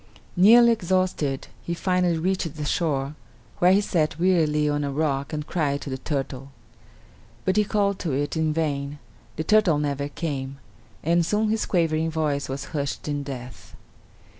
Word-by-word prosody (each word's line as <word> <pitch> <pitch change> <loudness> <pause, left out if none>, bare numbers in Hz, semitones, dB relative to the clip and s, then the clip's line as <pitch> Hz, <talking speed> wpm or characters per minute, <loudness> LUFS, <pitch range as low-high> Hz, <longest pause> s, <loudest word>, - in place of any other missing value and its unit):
Nearly 235 +6 +7
exhausted; 185 -9 0 0.2
he 170 - -3
finally 180 -1 +1
reached 175 -2 -1
the 150 -1 -4
shore, 145 -3 0 0.5
where 180 +1 +5
he 195 +2 +5
sat 160 -7 0
wearily 160 -5 +2
on 145 0 0
a 140 - -2
rock 140 -1 -1
and 150 -1 -3
cried 145 -5 -1
to 140 - -6
the 130 - -4
turtle. 135 -1 -4 1.0
But 190 - +2
he 210 - +4
called 200 -2 0
to 165 - -2
it 145 +4 -1
in 160 -1 +1
vain; 145 -2 -2 0.4
the 155 - -2
turtle 205 -4 +4
never 140 -1 -1
came, 140 -4 -4 0.5
and 170 +2 +3
soon 210 +5 +1
his 220 0 0
quavering 165 -3 +1
voice 150 -4 -1
was 135 +1 -4
hushed 145 -1 -3
in 145 -1 -1
death. 130 -3 -9
155 Hz, 165 wpm, -24 LUFS, 140-180 Hz, 1.0 s, Nearly